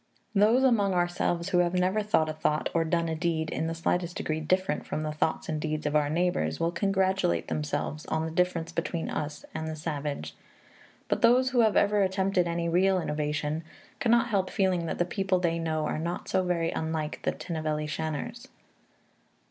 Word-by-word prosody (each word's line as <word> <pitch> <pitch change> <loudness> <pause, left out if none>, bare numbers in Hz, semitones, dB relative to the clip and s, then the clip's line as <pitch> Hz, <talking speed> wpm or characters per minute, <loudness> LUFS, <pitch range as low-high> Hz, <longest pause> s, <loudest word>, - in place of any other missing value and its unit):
Those 220 +5 +4
among 205 -7 +3
ourselves 175 0 0
who 180 - +3
have 175 0 +2
never 185 +4 +2
thought 205 -7 +2
a 155 - -2
thought 155 0 0
or 165 - +3
done 170 +1 0
a 160 - -1
deed 160 -1 -1
in 160 - -1
the 165 - -3
slightest 175 +1 -1
degree 155 0 -2
different 185 +5 0
from 155 - -3
the 155 - -2
thoughts 155 +1 -1
and 155 -1 -2
deeds 155 -1 -2
of 150 0 0
our 150 -1 +3
neighbors 175 +3 0
will 165 0 +1
congratulate 190 - +1
themselves 80 - -3
on 160 0 -1
the 160 - -4
difference 170 -1 0
between 170 0 -3
us 150 0 -4
and 160 0 -3
the 160 - -4
savage. 145 - -4 0.7
But - - 0
those 255 +3 +5
who 250 - +2
have 220 -3 +4
ever 205 0 +3
attempted 190 -1 +1
any 170 0 -1
real 185 +3 +3
innovation 150 0 -2 0.4
cannot 235 -2 +3
help 195 -4 +1
feeling 185 -4 +1
that - - -3
the 175 - +2
people 190 +1 0
they 170 -2 0
know 155 -2 -1
are 155 - -2
not 170 +2 -3
so 190 - +2
very 170 -2 0
unlike 160 -1 -3
the - - 0
Tinnevelly 155 -2 -3
Shanars. 160 - -4
170 Hz, 190 wpm, -28 LUFS, 155-190 Hz, 0.7 s, those